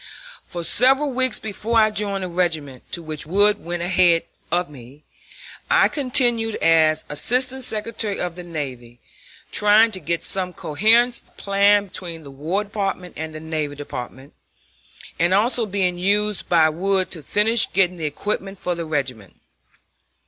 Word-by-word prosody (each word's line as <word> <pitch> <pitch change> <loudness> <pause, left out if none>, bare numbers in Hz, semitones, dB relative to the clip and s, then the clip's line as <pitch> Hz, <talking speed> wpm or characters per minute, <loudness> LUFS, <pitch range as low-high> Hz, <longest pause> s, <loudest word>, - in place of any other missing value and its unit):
For 175 -1 -6
several 265 - +3
weeks 255 0 0
before 220 +2 -3
I 215 -1 +4
joined 200 -2 -2
the - - -3
regiment, 160 -7 -3
to 170 - -4
which 155 -2 -6
Wood 205 +4 +3
went 175 0 -4
ahead 175 -2 +3 0.3
of 175 +1 +1
me, 140 +1 -15 0.7
I - - +4
continued 245 -5 +1
as 160 -1 +3
Assistant 255 - +1
Secretary 215 -2 -1
of 175 -1 -3
the 180 - -7
Navy, 130 -8 -7 0.5
trying 210 +2 +4
to 190 - -1
get 170 +1 -3
some 185 -2 +1
coherence 225 +11 +2
of - - -32
plan 200 +1 +3
between 170 -4 -5
the 140 - -11
War 160 +9 -2
Department 195 -3 -4
and 160 0 -6
the - - -6
Navy 155 -2 -4
Department; 130 -1 -8 0.9
and 175 +3 +3
also 230 +2 +2
being 185 -3 -1
used 205 +2 0
by 165 -3 +5
Wood 185 +4 -1
to 165 - -4
finish 220 +7 +3
getting 185 -1 +1
the 160 - -4
equipment 195 +5 -4
for 180 - -3
the 170 -1 -5
regiment. 130 - -4
180 Hz, 155 wpm, -21 LUFS, 160-210 Hz, 0.9 s, by